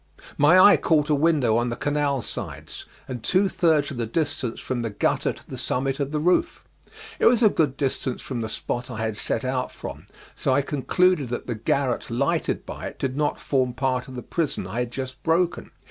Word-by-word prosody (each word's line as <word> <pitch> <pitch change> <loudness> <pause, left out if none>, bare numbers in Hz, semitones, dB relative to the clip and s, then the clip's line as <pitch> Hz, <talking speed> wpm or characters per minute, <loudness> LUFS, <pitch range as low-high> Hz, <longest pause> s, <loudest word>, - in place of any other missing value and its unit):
My 150 +6 +6
eye 200 +2 +8
caught 150 -2 +2
a - - +5
window 145 -7 +3
on 120 +1 +1
the 120 - -3
canal 145 -3 0
sides, - - -6 0.2
and 125 -3 -5
two 190 - +2
thirds 160 -6 +2
of 135 - -6
the 115 -1 -2
distance 135 -3 -2
from 130 -2 -3
the 115 - -2
gutter 100 - 0
to - - -14
the - - -6
summit 135 +2 -1
of 140 -1 -1
the 155 - -2
roof. 180 - +1 0.6
It - - +5
was 240 0 +4
a 215 - +7
good 145 -4 +1
distance 130 -2 -1
from 125 -3 -4
the 110 - -3
spot 120 +3 -4
I 110 -3 -4
had 110 -1 -2
set 130 - -1
out 130 0 -1
from, - - -9 0.3
so 130 - 0
I 140 +1 +3
concluded 150 +1 +1
that 120 - -4
the 120 - -2
garret 125 +3 -1
lighted 120 +4 0
by - - -6
it - - -9
did 130 -1 -2
not 150 0 0
form 130 -3 0
part 130 -1 -1
of 130 - -9
the 125 - -6
prison 160 - -2
I 100 +6 -4
had 125 -1 -2
just 130 +1 -6
broken. 170 +2 0
135 Hz, 215 wpm, -24 LUFS, 125-150 Hz, 0.6 s, eye